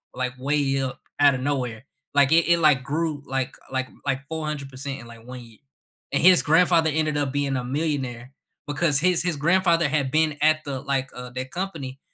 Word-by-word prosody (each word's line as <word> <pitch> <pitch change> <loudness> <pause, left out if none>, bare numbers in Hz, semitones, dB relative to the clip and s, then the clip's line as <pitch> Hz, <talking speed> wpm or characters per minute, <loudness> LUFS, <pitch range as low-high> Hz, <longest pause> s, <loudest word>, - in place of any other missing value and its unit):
like, 125 0 -2
way 135 0 0
up 130 -1 -4 0.2
out 145 -2 +5
of 125 - -5
nowhere, 130 -4 -2 0.3
like, 140 0 +4
it 165 +1 +4
it 170 - +4
like, 150 -5 +4
grew 150 +1 -2
like 135 -1 -2 0.2
like 130 0 -2 0.2
like, 135 -1 -1
400% 140 -4 -5
in 120 - -12
like, 115 -1 -14
1 125 0 -8
year, 115 -2 -16 0.5
and 140 - +2
his 180 0 +7
grandfather 165 0 +4
ended 155 -1 0
up 145 -2 -1
being 140 -2 0
a 125 - -3
millionaire 130 -3 -3 0.4
because 145 0 +1
his 180 +2 +2
his 175 -2 0
grandfather 170 +1 +3
had 140 -3 0
been 155 0 +1
at 155 0 +3
the, 140 -2 -4
like, 135 -1 -2
uh, 125 0 -7
the 125 +1 -4
company, 140 -4 -6
140 Hz, 195 wpm, -24 LUFS, 130-155 Hz, 0.5 s, his